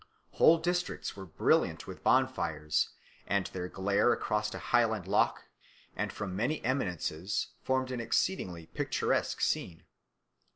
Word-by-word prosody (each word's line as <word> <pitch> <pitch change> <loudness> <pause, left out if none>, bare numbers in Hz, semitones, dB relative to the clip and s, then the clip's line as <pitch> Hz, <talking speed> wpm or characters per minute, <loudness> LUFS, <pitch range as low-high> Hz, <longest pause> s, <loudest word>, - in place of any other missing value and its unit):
Whole 165 - +6
districts 175 +2 -2
were 95 -1 -8
brilliant 80 - +1
with - - -9
bonfires, 75 -1 +2 0.4
and 100 -2 +1
their 90 -1 -4
glare 100 +5 +2
across 105 0 0
a - - -5
Highland 110 -5 +1
loch, - - +2 0.5
and - - -2
from 100 -4 -5
many 125 +10 0
eminences, 95 - -1
formed 130 0 0
an 125 -2 -2
exceedingly 90 - -1
picturesque - - -1
scene." 85 -2 -1
105 Hz, 125 wpm, -31 LUFS, 90-130 Hz, 0.5 s, Whole